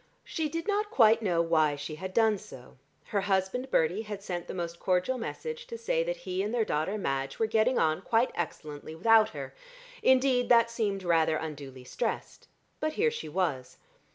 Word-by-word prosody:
She 315 -3 -2
did 330 +4 -4
not 415 0 0
quite 225 - +5
know 175 -5 +2
why 155 -3 +2
she 145 +2 -6
had 185 +5 -6
done 220 0 +3
so: 125 -7 -13 0.3
her 200 - +1
husband 195 +6 0
Bertie 175 +3 +2
had 210 -2 -7
sent 175 -3 -4
the - - -5
most 170 -1 -4
cordial 185 +8 +1
message 470 - -5
to 465 - -6
say - - 0
that - - -2
he 185 +1 -1
and 205 +2 -2
their 235 -2 +1
daughter 160 +7 -1
Madge 135 -8 -2
were 225 - +2
getting 220 +3 +2
on 155 +2 +2
quite 230 +5 +2
excellently 155 -2 -5
without 220 +5 +5
her - - -7 0.5
indeed 260 -1 +3
that 230 -1 +5
seemed 205 -5 -1
rather 165 -2 +3
unduly 140 -5 -6
stressed 225 - -4 0.3
but... 310 0 -1
here 460 +7 +2
she 460 - -6
was. 150 -7 -2
200 Hz, 185 wpm, -29 LUFS, 165-245 Hz, 0.5 s, quite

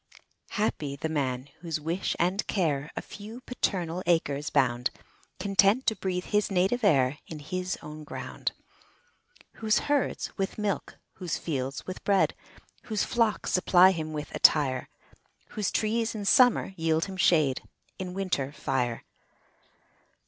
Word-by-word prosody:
Happy 155 -9 -1
the 150 - -3
man, 135 -4 -2
whose 165 -2 -3
wish 165 +5 -2
and 185 +4 0
care 150 -7 0
A - - -4
few 215 +4 -9
paternal 180 -9 -2
acres 150 -4 +1
bound, 125 -4 +2 0.5
Content 200 +5 +3
to 220 - +2
breathe 180 -2 -2
his 210 0 +1
native 195 +6 +1
air 145 -6 +3
In 160 - -7
his 180 +4 -3
own 150 +1 -8
ground. 150 - -4 1.1
Whose 215 -1 +2
herds 290 -2 0
with 195 0 -2
milk, 210 -2 -2 0.2
whose 180 -4 -2
fields 135 -4 -3
with 185 - -7
bread, 200 -2 +3 0.5
Whose 215 -3 0
flocks 230 -3 +1
supply 185 0 +6
him 160 -3 -4
with 150 -1 -5
attire; 135 -4 +4 0.6
Whose 210 -3 -1
trees 225 +1 0
in 205 -2 -4
summer 245 -2 +5
yield 160 0 +1
him 195 - -7
shade 155 -7 +3 0.4
In 185 -1 -5
winter, 175 -8 -1
fire. 125 -5 -2
180 Hz, 135 wpm, -28 LUFS, 150-200 Hz, 1.1 s, supply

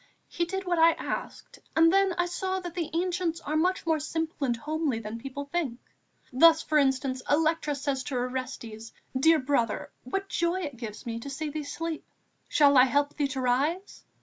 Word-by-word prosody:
He 345 - -1
did 385 +2 -4
what 350 -2 +1
I 330 +1 +7
asked, - - -6 0.2
and 330 +2 +5
I 390 0 +6
then 350 0 +1
saw 375 +1 -2
that 350 -2 -7
the 340 -3 -3
Ancients 345 0 -1
are 305 0 -3
much 360 +4 +1
more 320 -1 +2
simple 315 -1 -2
and 240 -1 0
homely 300 -1 -1
than 225 +1 -6
people 275 +3 -6
think. 285 -5 -2 0.6
Thus, 320 +4 +6
for 305 -1 +2
instance, 265 -1 +1
Electra 310 0 +2
says 280 -1 -2
to 270 - -4
Orestes: 245 -3 -4 0.2
'Dear 320 +5 +5
brother, 255 -6 0
what 390 +10 -3
joy 345 0 0
it 285 -7 -5
gave 220 -3 -7
me 230 -1 -3
to 280 - -7
see 300 +3 -4
thee 305 0 -4
sleep! 325 +2 -4 0.4
Shall 285 -2 +5
I 255 - +8
help 285 +2 +1
thee 290 -2 0
to 265 -1 -4
rise?' 285 +10 0
295 Hz, 190 wpm, -28 LUFS, 260-335 Hz, 0.6 s, I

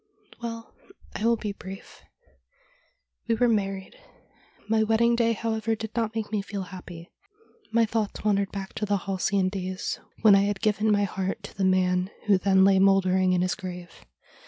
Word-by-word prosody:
' - - -23
Well, 230 -1 -6 0.4
I - - -4
will 230 +1 +3
be 210 -1 -4
brief. 195 -1 -10 1.3
We 230 - +2
were 245 +2 +3
married. 195 -4 -2 0.7
My 220 0 +2
wedding 225 +2 +3
day, 230 -1 +2
however, 225 0 -1
did 220 0 -7
not 225 -1 -1
make 220 -2 -3
me 210 -2 0
feel 195 0 -5
happy. 180 -3 -10 0.6
My 230 0 +4
thoughts 220 -1 -3
wandered 200 -2 +1
back 195 -1 -6
to 210 - -2
the 205 0 +2
halcyon 190 0 0
days, 185 -1 -4 0.2
when 215 -2 +8
I 195 - +6
had 205 -1 -1
given 215 0 +1
my 205 -1 +3
heart 195 +1 -3
to - - -10
the 195 - 0
man 185 0 +2 0.2
who 200 -3 +4
then 190 0 +4
lay 195 -1 +5
mouldering 190 -1 +3
in 180 0 +2
his 185 - 0
grave. 180 -3 -7
200 Hz, 180 wpm, -26 LUFS, 190-220 Hz, 1.3 s, when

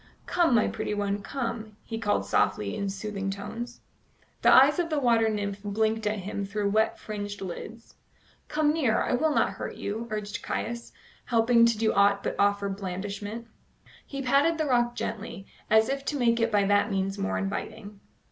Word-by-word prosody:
"Come, 340 -8 +3
my 220 - +4
pretty 210 - -3
one, 205 0 -1
come," 230 -4 -4
he 225 -1 -5
called 205 -2 0
softly 100 0 +1
in 200 - -2
soothing 195 0 -4
tones. 235 +5 -6 0.6
The - - +6
eyes 280 +5 +7
of 340 -1 0
the 305 -2 +1
water 230 -4 +3
nymph 205 -2 -3
blinked 220 +1 0
at 215 +1 0
him 200 +1 -4
through 200 0 -1
wet 220 +1 +2
fringed 205 -1 -6
lids. 220 +5 -8 0.5
"Come 300 0 +2
near; 265 -9 +2
I - - -1
will 315 +6 +2
not 300 - +2
hurt - - -6
you," 220 +3 -4
urged 210 -1 -4
Caius, 235 0 -4 0.3
helpless 230 0 +4
to - - -9
do 220 0 +2
aught 200 0 +3
but - - -2
offer 200 0 +2
blandishment. 200 +3 -5 0.6
He 275 -1 -6
patted 280 +6 +3
the 315 - 0
rock 240 -3 +2
gently, 220 -4 -5 0.2
as 220 0 +5
if 275 0 -2
to 295 - -1
make 235 -2 +2
it 230 0 +1
by 205 -1 +3
that 205 +2 +3
means 195 -1 -1
more 95 0 -1
inviting. 200 - -5
215 Hz, 180 wpm, -27 LUFS, 200-235 Hz, 0.6 s, eyes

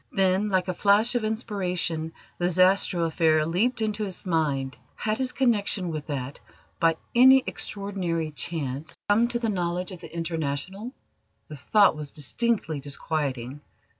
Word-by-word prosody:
Then, 195 +2 +2
like 185 -2 +1
a 185 - -1
flash 205 +6 +3
of 245 -2 0
inspiration, 180 -7 -2 0.3
the 175 0 +1
Zastrow 185 0 +3
affair 155 -1 +2
leapt 220 +9 +1
into 215 0 -1
his 190 -1 -7
mind. 145 -6 0 0.2
Had 215 +2 -2
his 260 -1 0
connection 205 -7 +1
with 155 -2 -5
that, 140 -2 -4 0.4
by 165 -1 +3 0.2
any 260 +2 +7
extraordinary 180 -6 -3
chance, 145 -2 -4
come 225 +3 +4
to 240 0 -1
the 235 -1 -2
knowledge 180 -1 -2
of 180 -2 -9
the - - -10
International? 165 - -4 0.6
The 150 - -8
thought 200 +8 +4
was 150 -1 -4
distinctly 165 - -1
disquieting. 140 -2 -4
180 Hz, 145 wpm, -26 LUFS, 155-210 Hz, 0.6 s, any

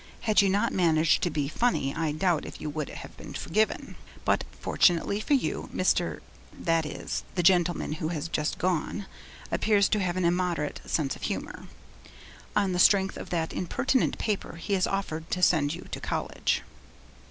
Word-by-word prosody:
Had 215 -2 +4
you 200 - +3
not 200 +2 +1
managed 165 -3 +3
to 175 - +1
be 145 -3 -1
funny 150 - 0
I 160 -1 -1
doubt 165 +1 +1
if - - -9
you 150 - -4
would 150 -1 -3
have - - -9
been - - -9
forgiven. 215 +6 -1 0.3
But - - +2
fortunately 175 +3 +2
for 285 +6 +2
you, 265 - -2
Mr., - - +1 0.4
that 165 -2 +1
is, - - -4
the 175 - +1
gentleman 175 -2 +3
who 155 0 -3
has 160 -1 -3
just 150 -2 -1
gone 185 +3 -1 0.5
appears 205 -2 +3
to 215 - +2
have 185 -2 -1
an 185 - +1
immoderate 170 -4 0
sense 140 -4 0
of - - -14
humour. - - -4 0.9
On 200 -2 +2
the 180 - -1
strength 195 +1 +5
of - - -8
that 165 -3 -1
impertinent 250 +8 0
paper, 205 -6 -2
he 170 +4 -4
has 185 -2 +2
offered 165 -5 -3
to 180 - -1
send 150 -3 +3
you 175 - -10
to - - -5
college.' - - -1
175 Hz, 175 wpm, -28 LUFS, 160-195 Hz, 0.9 s, strength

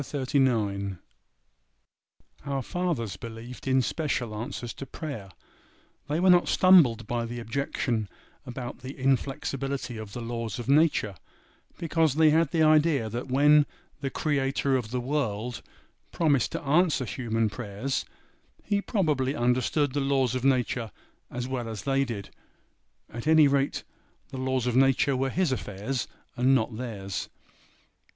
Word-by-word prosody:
CHAPTER 140 -1 -4
XXXIX. 100 -7 +1 1.5
OUR 135 -2 -1
fathers 130 - -2
believed 115 +4 -9
in 130 -1 +3
special 125 -7 -2
answers 115 +2 -5
to 135 - -8
prayer. 135 - -6 0.8
They 150 +3 0
were 185 +1 +5
not 175 0 +5
stumbled 155 - +5
by 120 +1 -2
the 120 +1 -5
objection 115 -3 -2 0.3
about 125 0 -7
the 130 +2 -8
inflexibility 135 -1 -1
of 110 -2 -8
the 120 - -5
laws 115 -1 -4
of 120 - -6
nature, 145 -8 +3 0.6
because 160 -3 +1
they 155 -1 +5
had 160 -1 +3
the 160 +1 +2
idea 155 -6 +4
that 120 +4 -4
when 145 +3 +5 0.3
the 140 -1 -2
Creator 135 -1 0
of 120 -4 -1
the 125 +2 -2
world 125 -4 -2 0.5
promised 145 -7 +1
to - - -4
answer 150 -1 +2
human 115 -1 -1
prayers, 115 +4 -3 0.6
He 205 -1 0
probably 150 - 0
understood 130 +3 +1
the 145 - 0
laws 135 -3 +1
of 130 -1 -2
nature 125 -3 +1 0.4
as 125 0 -4
well 125 -3 -3
as 110 -4 -6
they 135 0 +1
did; 110 -5 -6 0.8
at 120 +4 -6
any 160 -2 +7
rate, 140 0 0 0.5
the 135 - -7
laws 130 -1 0
of 125 -1 0
nature 135 +1 +4
were 135 +1 0
His 175 +1 +1
affairs 120 +2 -3 0.3
and 130 +2 +4
not 115 -2 0
theirs. 105 -5 -5
130 Hz, 145 wpm, -27 LUFS, 115-145 Hz, 1.5 s, any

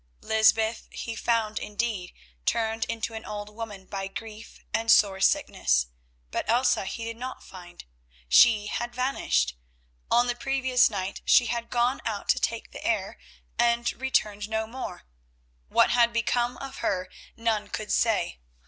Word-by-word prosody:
Lysbeth 220 0 +2
he 230 - -6
found 225 -2 0
indeed, 210 -3 -3 0.4
turned 225 0 +1
into 230 0 -3
an 220 0 -6
old 210 0 -6
woman 210 -4 -7
by 195 0 -4
grief 220 +2 -9
and 225 +1 0
sore 195 -2 +5
sickness, - - +2 0.4
but - - -3
Elsa 240 -3 +3
he 230 - -5
did 230 0 -5
not 255 +2 -6
find. 175 -2 -12 0.4
She 210 - +6
had 240 +3 -4
vanished. 155 - 0 0.5
On 240 +1 +4
the 245 - 0
previous 260 0 +2
night 195 -2 -4
she 245 - +5
had 235 0 -3
gone 245 +2 +1
out - - -4
to - - +4
take - - -2
the - - -9
air, - - -1 0.4
and 235 0 +2
returned 215 -5 -1
no 220 0 -1
more. 245 - -7 0.7
What - - +4
had 235 -1 +4
become 240 +1 0
of 270 -1 -8
her 185 -1 -1 0.3
none 220 -2 0
could 210 +1 -5
say. 210 - +1
225 Hz, 150 wpm, -27 LUFS, 205-240 Hz, 0.7 s, She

